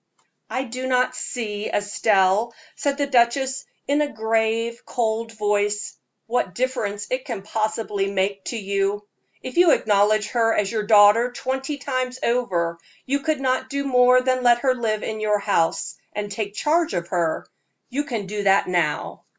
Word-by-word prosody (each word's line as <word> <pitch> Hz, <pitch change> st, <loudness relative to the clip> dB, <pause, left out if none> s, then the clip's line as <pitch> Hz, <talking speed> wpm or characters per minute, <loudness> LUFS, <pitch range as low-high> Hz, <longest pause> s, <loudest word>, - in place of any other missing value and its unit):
"I 260 Hz, -, -2 dB
do 255 Hz, +1 st, -5 dB
not 255 Hz, 0 st, +1 dB
see, 210 Hz, -5 st, -4 dB
Estelle," 205 Hz, +1 st, +2 dB, 0.2 s
said 280 Hz, -1 st, -1 dB
the 285 Hz, -, +1 dB
duchess, 265 Hz, +1 st, +1 dB, 0.2 s
in 285 Hz, +1 st, +2 dB
a 295 Hz, -1 st, -1 dB
grave, 225 Hz, +1 st, -1 dB
cold 225 Hz, -1 st, -2 dB
voice, 210 Hz, -1 st, -1 dB, 0.3 s
"what 225 Hz, -7 st, -1 dB
difference 215 Hz, -5 st, -2 dB
it 255 Hz, 0 st, -1 dB
can 230 Hz, -8 st, -5 dB
possibly 215 Hz, -2 st, -2 dB
make 195 Hz, 0 st, -1 dB
to 235 Hz, -, -3 dB
you. 200 Hz, 0 st, -1 dB, 0.4 s
If 255 Hz, -, -7 dB
you 350 Hz, -1 st, +6 dB
acknowledge 210 Hz, -3 st, +3 dB
her 230 Hz, -2 st, +2 dB
as 205 Hz, 0 st, 0 dB
your 215 Hz, -2 st, -2 dB
daughter 215 Hz, +3 st, +6 dB
twenty 265 Hz, +3 st, -3 dB
times 255 Hz, -2 st, -3 dB
over, 175 Hz, -9 st, 0 dB, 0.3 s
you 280 Hz, +2 st, 0 dB
could 305 Hz, -1 st, -1 dB
not 260 Hz, 0 st, 0 dB
do 280 Hz, +1 st, -2 dB
more 250 Hz, -1 st, +4 dB
than 255 Hz, 0 st, +1 dB
let 240 Hz, -1 st, +4 dB
her 260 Hz, 0 st, +3 dB
live 220 Hz, -4 st, -2 dB
in 220 Hz, -1 st, -4 dB
your 210 Hz, -1 st, +1 dB
house, 200 Hz, -5 st, 0 dB, 0.2 s
and 205 Hz, 0 st, -4 dB
take 205 Hz, 0 st, -4 dB
charge 325 Hz, +2 st, +1 dB
of 170 Hz, 0 st, -3 dB
her. 170 Hz, -3 st, -1 dB, 0.4 s
You 280 Hz, +4 st, -1 dB
can 230 Hz, -7 st, -3 dB
do 205 Hz, +2 st, -4 dB
that 195 Hz, 0 st, +3 dB
now." 170 Hz, -5 st, -1 dB
225 Hz, 165 wpm, -23 LUFS, 205-255 Hz, 0.4 s, you